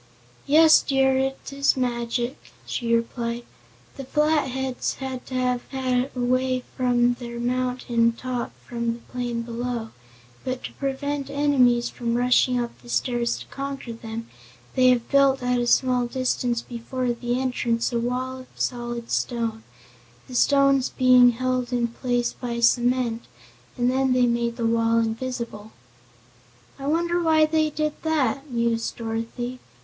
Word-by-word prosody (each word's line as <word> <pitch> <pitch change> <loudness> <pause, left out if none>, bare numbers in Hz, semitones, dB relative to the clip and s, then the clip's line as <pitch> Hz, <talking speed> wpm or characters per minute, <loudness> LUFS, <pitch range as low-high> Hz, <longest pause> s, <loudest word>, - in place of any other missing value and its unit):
"Yes, 315 +2 +7
dear, 270 -1 +2
it 270 +1 -3
is 275 0 +2
magic," 240 0 -1 0.3
she 235 -2 -3
replied. 235 0 -2 0.5
"The 275 - -5
Flatheads 265 -3 0
had 260 -2 -6
to 260 - -6
have 250 -1 +1
a 260 -1 0
way 255 +1 +1
from 245 -1 +3
their 235 -1 -6
mountain 245 -1 +1
top 250 0 -4
from 235 -1 -2
the 235 - -9
plain 240 -2 -2
below, 235 -1 -4 0.5
but 255 0 -4
to - - -6
prevent 280 +1 -3
enemies 270 -4 +3
from 235 -1 -2
rushing 250 0 +3
up 240 -1 -2
the 240 - -14
stairs 240 -1 0
to - - -9
conquer 275 -3 -5
them, 225 0 -7 0.5
they 255 -1 +4
have 245 -2 +2
built, 275 -2 +3
at 250 0 +1
a 240 - 0
small 250 -1 +3
distance 245 -2 -1
before 245 +1 -3
the 240 +1 -2
entrance 245 -2 0
a 235 - +1
wall 255 +2 -2
of 255 - -12
solid 240 -1 -3
stone, 230 -2 -1 0.7
the 255 - -10
stones 275 0 +4
being 255 -1 +6
held 255 0 -1
in 240 -1 +1
place 245 0 -1
by 235 -2 -4
cement, 240 0 +2 0.5
and 245 0 +2
then 265 0 +2
they 250 -1 +4
made 235 -1 0
the 235 -2 -2
wall 230 0 +2
invisible." 230 -1 -3 1.1
"I 275 - -5
wonder 340 +3 +1
why 315 -2 +4
they 310 0 +1
did 305 0 -1
that?" 285 -3 0
mused 235 -2 -1
Dorothy. 230 +2 -4
250 Hz, 145 wpm, -24 LUFS, 235-265 Hz, 1.1 s, Yes